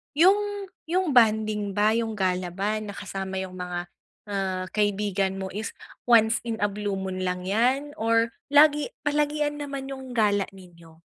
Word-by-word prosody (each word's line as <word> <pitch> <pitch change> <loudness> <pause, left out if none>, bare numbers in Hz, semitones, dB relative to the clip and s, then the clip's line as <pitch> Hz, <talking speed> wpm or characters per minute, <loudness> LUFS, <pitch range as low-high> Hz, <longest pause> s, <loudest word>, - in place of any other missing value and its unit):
yung 400 +4 +3 0.2
yung 360 0 +1
bonding 215 -4 +3
ba, 210 +1 +4
yung 225 -1 -1
gala 185 -2 0
ba 200 +5 -2
na 210 -2 -7
kasama 190 -1 -5
yung 185 -1 -9
mga, 175 0 -5 0.4
ah, 190 -2 -1
kaibigan 200 -2 0
mo 190 -1 -5
is 215 +3 -5 0.3
once 225 -1 +5
in 230 - -1
a - - +4
blue 205 0 -3
moon 190 -1 -4
lang 180 0 -2
'yan, 250 +9 +1
or 230 +1 +2 0.2
lagi 295 +1 +5 0.2
palagian 295 0 0
naman 275 -2 -5
yung 265 -2 -7
gala 205 -3 +2
ninyo? 170 -3 -16
215 Hz, 155 wpm, -26 LUFS, 190-270 Hz, 0.4 s, once